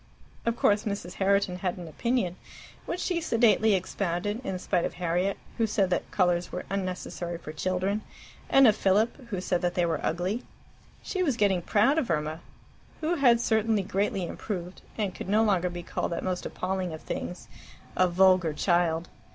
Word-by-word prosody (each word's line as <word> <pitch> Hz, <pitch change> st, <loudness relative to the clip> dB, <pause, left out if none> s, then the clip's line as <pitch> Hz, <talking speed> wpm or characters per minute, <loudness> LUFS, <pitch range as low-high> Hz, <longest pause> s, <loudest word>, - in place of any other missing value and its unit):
Of 230 Hz, -, +2 dB
course 210 Hz, -2 st, +3 dB
Mrs. 200 Hz, -4 st, -4 dB
Herriton 195 Hz, -1 st, +2 dB
had 180 Hz, 0 st, -2 dB
an 175 Hz, -2 st, -7 dB
opinion, 190 Hz, -, -1 dB, 0.5 s
which 355 Hz, -, -3 dB
she 350 Hz, -2 st, 0 dB
sedately 225 Hz, -6 st, +4 dB
expounded, 190 Hz, +3 st, -2 dB
in 190 Hz, -6 st, -3 dB
spite 180 Hz, -1 st, 0 dB
of -, -, -3 dB
Harriet, 180 Hz, +3 st, 0 dB, 0.2 s
who 225 Hz, -, +3 dB
said 200 Hz, -3 st, +1 dB
that -, -, -1 dB
colours 180 Hz, -2 st, +1 dB
were 180 Hz, -, -5 dB
unnecessary 185 Hz, -2 st, -3 dB
for 155 Hz, -2 st, -9 dB
children, 185 Hz, +5 st, -1 dB, 0.5 s
and 270 Hz, 0 st, +7 dB
of 215 Hz, -4 st, +6 dB
Philip, 220 Hz, +7 st, +1 dB
who 200 Hz, -5 st, -3 dB
said 180 Hz, -1 st, 0 dB
that 175 Hz, 0 st, 0 dB
they 175 Hz, -, +2 dB
were 165 Hz, -2 st, -1 dB
ugly. 185 Hz, +8 st, -1 dB, 0.6 s
She 375 Hz, -, -2 dB
was 280 Hz, -10 st, +1 dB
getting 195 Hz, -4 st, +2 dB
proud 240 Hz, -, +3 dB
of 265 Hz, -, -2 dB
Irma, 155 Hz, -1 st, -1 dB, 0.6 s
who 320 Hz, +2 st, +1 dB
had 245 Hz, -5 st, +5 dB
certainly 220 Hz, -3 st, +2 dB
greatly 195 Hz, -1 st, -1 dB
improved, 180 Hz, 0 st, -5 dB, 0.2 s
and 205 Hz, -4 st, -1 dB
could -, -, -7 dB
no 215 Hz, +2 st, +4 dB
longer 185 Hz, -4 st, +2 dB
be 175 Hz, 0 st, -6 dB
called 170 Hz, -, -3 dB
that -, -, -3 dB
most 185 Hz, -1 st, -2 dB
appalling 185 Hz, -2 st, -3 dB
of 160 Hz, -, -7 dB
things 180 Hz, -, -5 dB, 0.5 s
a 185 Hz, -, +4 dB
vulgar 185 Hz, -2 st, +4 dB
child. 170 Hz, 0 st, +1 dB
190 Hz, 175 wpm, -28 LUFS, 175-215 Hz, 0.6 s, and